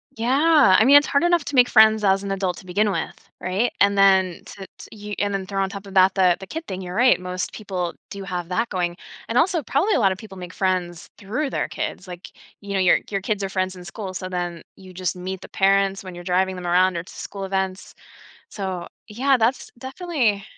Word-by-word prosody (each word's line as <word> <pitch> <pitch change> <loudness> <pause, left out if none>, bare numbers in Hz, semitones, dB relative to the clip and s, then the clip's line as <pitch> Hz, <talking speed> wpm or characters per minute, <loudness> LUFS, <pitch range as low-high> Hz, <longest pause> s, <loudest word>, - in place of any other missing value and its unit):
Yeah, 270 - +4
I 220 - +4
mean, 275 +3 +7
it's 290 - +3
hard 280 - +1
enough 345 -2 +3
to 290 - -4
make 250 -1 +6
friends 220 -1 +5
as 195 -1 +3
an 200 - -5
adult 190 -2 -2
to - - -12
begin 205 +4 +1
with, - - -3 0.3
right, 195 +7 0
and 200 0 +4
then 190 -2 +3
to 195 -1 -10
t - - -12
you 210 0 -7
and 205 0 -1
then 195 -1 -3
throw 195 0 -1
on 190 - -2
top 200 0 -8
of 195 - -11
that 190 0 +5
the 185 -3 +3
the 190 - -8
kid 325 - -7
thing, 190 0 -5
you're 180 -1 -7
right. 250 0 +4
Most 180 0 -4
people 185 -5 -4 0.2
do 200 -1 -7
have 180 -3 -4
that 230 +6 -1
going 175 -2 -2 0.3
and 230 - -1
also, 340 +1 +1
probably 310 - +1
a - - +2
lot 195 -4 +3
of 190 - -3
people 210 -4 -11
make 180 -1 -8
friends 180 -3 -2
through 245 +9 -3
their - - -2
kids, 185 - -5
like, 180 0 -9 0.3
you 200 -1 -6
know, 195 - +1
your 185 -1 +4
your 195 -1 -2
kids 205 0 -2
are 195 - -2
friends 185 -1 -2
in 180 - -11
school, 190 +1 -7
so, 185 0 -5
then 175 -2 -4
you 185 -1 -14
just 185 0 -3
meet 185 +1 -6
the - - -11
parents 195 -1 +2
when 185 -1 -9
you're 175 0 -9
driving 185 +1 0
them 180 -1 -6
around 180 +1 +3
or - - -2
to 180 - -14
school 200 -1 -7
events. 190 0 -3 0.5
So, 190 -4 -5 0.2
yeah, 260 +6 +2
that's 240 +2 0
definitely 260 - -1
195 Hz, 240 wpm, -22 LUFS, 185-220 Hz, 0.5 s, mean